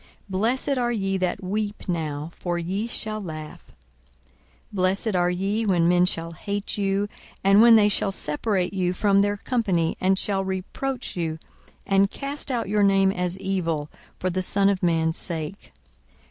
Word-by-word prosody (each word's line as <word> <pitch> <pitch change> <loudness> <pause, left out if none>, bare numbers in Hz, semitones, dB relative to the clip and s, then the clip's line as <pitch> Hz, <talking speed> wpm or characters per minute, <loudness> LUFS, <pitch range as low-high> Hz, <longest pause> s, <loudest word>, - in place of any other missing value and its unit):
Blessed 240 +8 0
are 240 -1 +1
ye 195 -4 -1
that 185 0 -2
weep 205 +3 -3
now: 155 -3 -3
for 175 -1 -3
ye 190 +6 -2
shall 215 -2 -3
laugh. 155 -4 -8
42:006:022 - - -23 1.0
Blessed 195 +2 +1
are 175 0 +3
ye, 195 +5 -1
when 180 -5 +3
men 180 +1 +4
shall 165 -1 -2
hate 200 +5 -4
you, 200 0 0 0.4
and 195 +2 +6
when 235 0 +8
they 210 -2 +6
shall 200 -1 +1
separate 185 +3 -1
you 180 -2 0
from 200 +1 +3
their 205 +1 +2
company, 195 -9 0
and 190 +1 +3
shall 195 -1 +1
reproach 190 +8 -4
you, 165 -3 -2 0.5
and 195 0 +3
cast 280 +2 -4
out 235 -4 -1
your 210 +1 +1
name 195 -1 +4
as 180 -1 -2
evil, 170 -6 -2 0.3
for 185 - -1
the 185 +2 -1
Son 195 +2 +2
of 195 -2 0
man's 165 -1 +1
sake. 165 +2 -5
195 Hz, 165 wpm, -24 LUFS, 175-205 Hz, 1.0 s, when